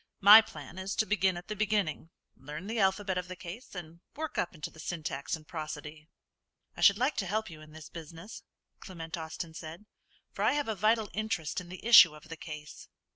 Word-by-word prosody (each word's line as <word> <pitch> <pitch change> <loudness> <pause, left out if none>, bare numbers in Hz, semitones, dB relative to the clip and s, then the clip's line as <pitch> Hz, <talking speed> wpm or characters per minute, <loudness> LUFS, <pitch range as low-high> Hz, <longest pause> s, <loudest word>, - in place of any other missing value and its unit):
My 210 +3 +11
plan 155 -4 -10
is 190 +1 -3
to 220 - +2
begin 190 -4 +1
at 175 - -9
the 215 - -4
beginning; 205 -7 -1 0.3
learn 150 +6 -8
the 225 +2 -3
alphabet 190 -1 +1
of 180 - -6
the 185 - -7
case, 185 +7 -9
and 170 -1 -8 0.2
work 315 +1 -4
up 175 - -2
into 150 - -6
the 160 - -16
syntax 155 -4 -3
and 155 -1 -14
prosody." 155 -1 -7 0.7
"I - - -8
should 200 -1 +7
like 260 +6 +1
to 195 - -1
help 215 0 -2
you 155 -1 -11
in 155 0 -14
this 155 -1 -11
business," 165 +4 -10 0.4
Clement 165 -3 -7
Austin 160 0 -6
said, 160 +5 -9 0.5
"for - - -6
I - - +4
have 290 -2 -1
a 220 - 0
vital 215 +1 +1
interest 205 -7 -2
in 175 - -12
the 185 +4 -10
issue 180 -9 +9
of 155 +1 -15
the 165 - -6
case." 150 -1 -9
175 Hz, 210 wpm, -30 LUFS, 155-210 Hz, 0.7 s, My